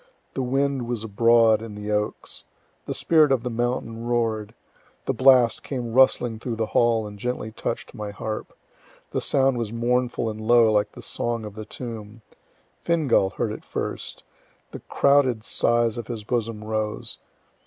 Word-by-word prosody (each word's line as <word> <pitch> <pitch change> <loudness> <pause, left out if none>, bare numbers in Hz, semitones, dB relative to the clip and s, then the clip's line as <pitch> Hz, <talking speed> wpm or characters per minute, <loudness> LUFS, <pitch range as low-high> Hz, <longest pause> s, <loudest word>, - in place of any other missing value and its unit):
The 135 - -2
wind 135 0 0
was 120 -3 -3
abroad 115 +1 +4
in 110 -2 -8
the 105 0 -5
oaks. 105 0 -3 0.4
The - - -3
spirit 155 -4 +4
of 130 -3 +2
the 125 - -3
mountain 120 -1 -2
roar'd. 115 -2 -1 0.5
The - - 0
blast 130 -3 +5
came 120 -4 -4
rustling 120 -3 +3
through 120 0 -4
the 110 0 -1
hall, 115 -2 +3
and 105 -1 -9
gently 120 -2 -3
touch'd - - -4
my 105 -1 -5
harp. 110 +2 -5 0.6
The - - -1
sound 135 -2 +2
was 110 -3 -3
mournful 120 0 0
and 110 0 -4
low, 115 0 +5
like 105 -1 +1
the - - -11
song 115 -2 -2
of 105 - -7
the 110 0 -7
tomb. 110 -2 -8 0.6
Fingal 150 - +2
heard 110 +3 -2
it - - -6
the - - -25
first. - - -4 0.5
The - - -7
crowded 135 -5 +2
sighs 120 0 +1
of 120 - -7
his 115 -3 -5
bosom 115 -2 -2
rose. 110 0 -3
115 Hz, 165 wpm, -24 LUFS, 110-125 Hz, 0.6 s, blast